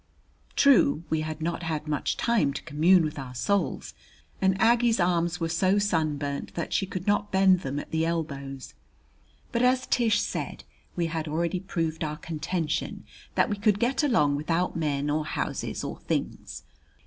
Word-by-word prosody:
True, 240 - +5
we 160 -1 +1
had 155 0 -5
not 170 +1 -2
had 155 -2 -3
much 150 -1 -1
time 215 -13 +2
to - - -6
commune 165 +3 +4
with 150 -1 -4
our 125 -2 -7
souls, 200 +10 -1 0.5
and 190 0 +2
Aggie's 230 +1 +4
arms 175 -1 +1
were 165 - 0
so 185 +4 +2
sunburned 155 -8 -1
that 170 - -3
she 195 - +1
could 185 -1 -5
not 205 0 +1
bend 190 -1 +5
them 140 -4 -4
at - - -6
the 160 0 +1
elbows. 140 - -4 0.8
But, 235 - 0
as 255 +1 +3
Tish 230 -2 +2
said, - - -4 0.3
we 175 - 0
had 160 -1 -3
already 170 +4 -1
proved 165 -3 -2
our 150 -1 -3
contention 160 0 -3 0.3
that - - +3
we 205 - -2
could 205 0 +2
get 250 +5 +1
along 150 - +3
without 165 +4 -1
men 145 -3 -1
or 155 +1 0
houses 155 - -3
or - - -5
things. - - -4
165 Hz, 170 wpm, -27 LUFS, 150-195 Hz, 0.8 s, True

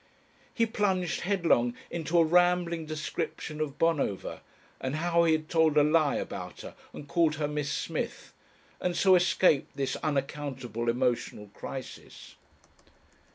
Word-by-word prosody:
He 230 - +2
plunged 200 -6 0
headlong 170 -11 +2 0.2
into 170 0 -1
a 165 - +7
rambling 175 -1 +2
description 155 0 -4
of 145 -3 -3
Bonover 150 - 0 0.4
and 130 +2 -3
how 170 +1 +2
he 160 - +4
had 155 0 -1
told 160 -2 +3
a 150 - +7
lie 155 -1 +3
about 90 -1 -5
her - - -9 0.2
and 145 - -10
called 165 -1 +2
her 150 -1 -1
Miss 150 -1 -2
Smith, - - -4 0.5
and 180 -1 -1
so 190 -1 +5
escaped 180 -4 +3
this 135 -1 -1
unaccountable 135 -5 -3
emotional 120 -4 -1
crisis.... 130 -1 -9
155 Hz, 135 wpm, -29 LUFS, 140-170 Hz, 0.5 s, a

